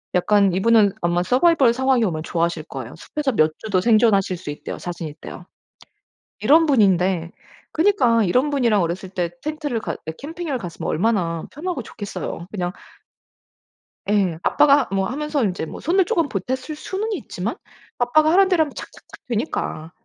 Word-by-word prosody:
약간 200 0 +3
이분은 205 0 +4
아마 175 +1 +1
서바이벌 260 - +4
상황이 260 -1 +2
오면 155 -4 -2
좋아하실 170 -2 -1
거예요. 130 -3 -7
숲에서 290 - -3
몇 155 -4 +3
주도 200 -4 -1
생존하실 210 -4 +3
수 170 - -9
있대요. 145 - -6
자신이 170 -3 -6
있대요. 170 +3 -11 1.0
이런 310 +9 +5
분인데 185 - +2 0.4
그니까 310 - +3
이런 255 +11 +2
분이랑 235 -8 +2
어렸을 175 +3 -3
때 175 -3 -2
텐트를 300 -6 -3
가 - - -4
예 160 - -3
캠핑을 315 -2 -4
갔으면 175 -6 -6
얼마나 170 -3 0
편하고 315 -3 -4
좋겠어요. 185 -5 -6
그냥 180 -3 -2 1.4
예. 190 -6 +1
아빠가 285 -1 +4
뭐 195 -1 0
하면서 295 0 -2
인제 180 -5 -1
뭐 - - -9
손을 365 +3 +2
조금 330 -5 0
보탰을 245 +6 -2 0.2
수는 410 +7 -4
있지만 - - -4 0.4
아빠가 310 +6 +3
하라는 385 +2 +5
대로 350 -4 +3
하면 290 - -8
착착착 - - -12
되니까 210 - -3
215 Hz, 365 characters per minute, -21 LUFS, 175-290 Hz, 1.4 s, 이런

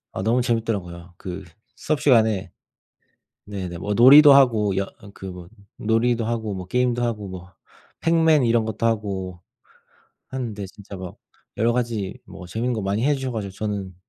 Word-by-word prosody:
아 - - -4
너무 115 +5 +2
재미있더라고요. 95 -7 -3
그 95 +1 -7 0.3
수업 155 -1 -2
시간에 110 -8 +3 1.0
네네. 90 -4 -5
뭐 105 +3 -2
놀이도 140 +6 +9
하고 110 -8 +4
여 100 - 0 0.3
그 95 - -9
뭐 90 -2 -9 0.3
놀이도 115 +1 +1
하고 110 -3 -2
뭐 90 -1 -6
게임도 125 +2 0
하고 105 -4 -2
뭐 90 0 -10 0.5
행맨 160 -4 +4
이런 115 -1 +2
것도 110 +1 -2
하고 95 -5 -2 0.9
하는데 115 -6 -5
진짜 100 0 -12
막 95 -2 -8 0.4
여러 115 +2 +2
가지 115 -6 -2
뭐 90 - -11
재미있는 115 +7 -2
거 110 - -3
많이 100 +4 -1
해 145 -1 +3
주셔 130 -1 -4
가지고 105 -4 -4
저는 100 -3 -4
110 Hz, 310 characters per minute, -23 LUFS, 95-120 Hz, 1.0 s, 놀이도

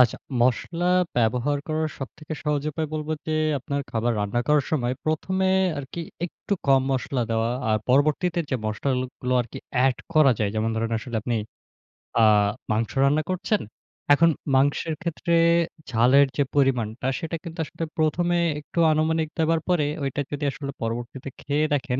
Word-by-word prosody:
আচ্ছা, 125 -3 +5 0.2
মশলা 130 +8 +1 0.3
ব্যবহার 125 +5 +1
করার 155 0 0
সবথেকে 150 +3 -8
সহজ 150 -2 0
উপায় 155 +1 -3
বলবো 155 0 -2
যে 155 - -1 0.3
আপনার 140 +2 -3
খাবার 115 +1 0
রান্না 105 +4 0
করার 150 -2 +3
সময় 125 -5 0
১ম 155 +4 -1 0.2
এ - - +3 0.3
আরকি 140 +4 -6 0.3
একটু 190 - -7
কম 135 -1 +5
মসলা 130 -1 -1
দেওয়া। 115 +1 +1 0.2
আর 110 - +3
পরবর্তীতে 155 +6 +2
যে 130 - +1
মসলাগুলো 125 +3 -2
আরকি 120 - -9 0.3
এড 135 -2 +3 0.2
করা 155 -4 +6
যায়, 105 -2 0
যেমন 110 +1 0
ধরেন 115 +1 -1
আসলে 120 +1 -5
আপনি 120 +1 -1 0.9
আ - - +6 0.5
মাংস 110 +1 0
রান্না 145 +3 +3
করছেন। 185 +3 0 0.5
এখন 165 +3 +5 0.3
মাংসের 145 +4 +2
ক্ষেত্রে 170 0 -2 0.6
ঝালের 130 +4 +5
যে 145 - +4
পরিমাণটা, 125 -4 +1
সেটা 165 -1 -4
কিন্তু 165 -1 -8
আসলে 165 - -6
১ম 155 +2 +1
এ - - +2 0.2
একটু 150 +3 -5
আনুমানিক 160 +1 +1
দেবার 165 0 +3
পরে, 175 -5 +3 0.2
ওইটা 140 +1 -1
যদি 145 0 -4
আসলে 140 +1 -6
পরবর্তীতে 120 +3 -4
খেয়ে 150 +2 +1
দেখেন, 135 -3 0
140 Hz, 160 wpm, -24 LUFS, 125-155 Hz, 0.9 s, করা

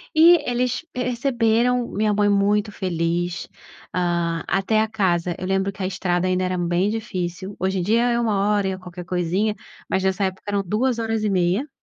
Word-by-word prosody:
e 335 +2 +8
eles 250 +4 -1
perceberam 245 -1 +1
minha 210 0 +1
mãe 205 0 +2
muito 205 +1 +2
feliz 175 -1 -2 0.5
hã, 170 -2 0
até 215 +3 +2
a 220 - +1
casa, 180 -5 0
eu 185 - -4
lembro 195 +1 0
que 195 - -10
a 185 - 0
estrada 180 -1 -1
ainda 185 0 +1
era 185 0 -1
bem 175 +3 +1
difícil, 190 -3 -4
hoje 190 +1 0
em - - 0
dia 225 +6 +2
é 235 - +1
1 220 -4 +1
hora 205 -2 +2
e - - 0
é 185 - -4
qualquer 180 -1 -9
coisinha, 185 +4 0 0.3
mas 190 - 0
nessa 190 +1 +1
época 190 0 -4
eram 200 -1 0
2 230 +6 0
horas 225 -1 -1
e 210 - +1
meia 190 +9 +1
195 Hz, 195 wpm, -22 LUFS, 180-220 Hz, 0.5 s, e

